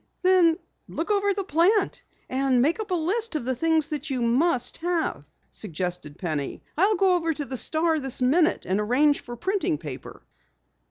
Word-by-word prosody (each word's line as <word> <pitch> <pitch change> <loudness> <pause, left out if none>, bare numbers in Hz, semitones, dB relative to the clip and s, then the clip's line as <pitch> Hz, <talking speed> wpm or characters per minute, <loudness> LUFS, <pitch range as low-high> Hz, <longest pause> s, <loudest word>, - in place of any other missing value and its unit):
"Then 360 -3 +5 0.3
look 335 +6 -3
over 405 0 +2
the 395 0 -2
plant 365 +5 +2 0.3
and 260 -1 +1
make 310 - +2
up 435 -1 -4
a 365 - +1
list 380 +5 0
of 295 - -2
the 260 0 0
things 320 +3 +1 0.2
you 255 -3 -1
must 250 +1 +1
have," 335 - -2 0.3
suggested 175 -5 -5
Penny. 155 -6 -4
"I'll 395 +6 +3
go 380 0 +3
over 330 -3 0
to 290 - -4
the 265 - -6
Star 315 +4 +1
this 270 -2 0
minute 310 +7 +2
and 190 +2 0
arrange 270 +7 +2
for 240 - -9
printing 380 - -1
paper." 145 -4 -9
310 Hz, 170 wpm, -25 LUFS, 240-355 Hz, 0.3 s, Then